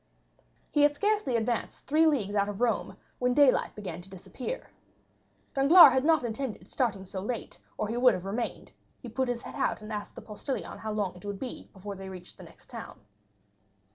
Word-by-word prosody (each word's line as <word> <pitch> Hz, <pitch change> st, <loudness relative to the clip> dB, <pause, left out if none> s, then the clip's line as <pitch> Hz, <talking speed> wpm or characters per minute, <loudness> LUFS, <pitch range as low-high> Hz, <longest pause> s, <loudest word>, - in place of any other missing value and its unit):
He 295 Hz, -, +3 dB
had 290 Hz, 0 st, +5 dB
scarcely 415 Hz, -, +1 dB
advanced 230 Hz, 0 st, -2 dB
three 315 Hz, +3 st, +4 dB
leagues 220 Hz, -10 st, +1 dB
out 200 Hz, 0 st, +2 dB
of 205 Hz, 0 st, -5 dB
Rome 235 Hz, -3 st, 0 dB, 0.2 s
when 250 Hz, 0 st, +2 dB
daylight 285 Hz, -3 st, +4 dB
began 180 Hz, -5 st, -6 dB
to 185 Hz, -, -15 dB
disappear. 250 Hz, -, -7 dB, 0.8 s
Danglars 280 Hz, +1 st, +9 dB
had 260 Hz, 0 st, +2 dB
not 315 Hz, -3 st, +4 dB
intended 235 Hz, 0 st, -4 dB
starting 210 Hz, -7 st, 0 dB
so 190 Hz, 0 st, -5 dB
late, 230 Hz, +4 st, -4 dB, 0.2 s
or 215 Hz, -, -1 dB
he 230 Hz, +3 st, -2 dB
would 245 Hz, -3 st, +5 dB
have 180 Hz, 0 st, -6 dB
remained; 225 Hz, +4 st, -4 dB, 0.3 s
he 245 Hz, -, -8 dB
put 255 Hz, +3 st, -1 dB
his 240 Hz, -1 st, -2 dB
head -, -, -8 dB
out -, -, 0 dB
and 215 Hz, +1 st, -6 dB
asked 205 Hz, -1 st, -5 dB
the -, -, -8 dB
postilion 230 Hz, +5 st, -5 dB
how 220 Hz, -, -4 dB
long 205 Hz, -4 st, -1 dB
it 180 Hz, -, -14 dB
would 205 Hz, -1 st, -4 dB
be 250 Hz, +4 st, -7 dB
before 200 Hz, 0 st, -7 dB
they 190 Hz, 0 st, -8 dB
reached 180 Hz, -2 st, -10 dB
the -, -, -9 dB
next -, -, -16 dB
town. -, -, -9 dB
230 Hz, 200 wpm, -29 LUFS, 200-265 Hz, 0.8 s, Danglars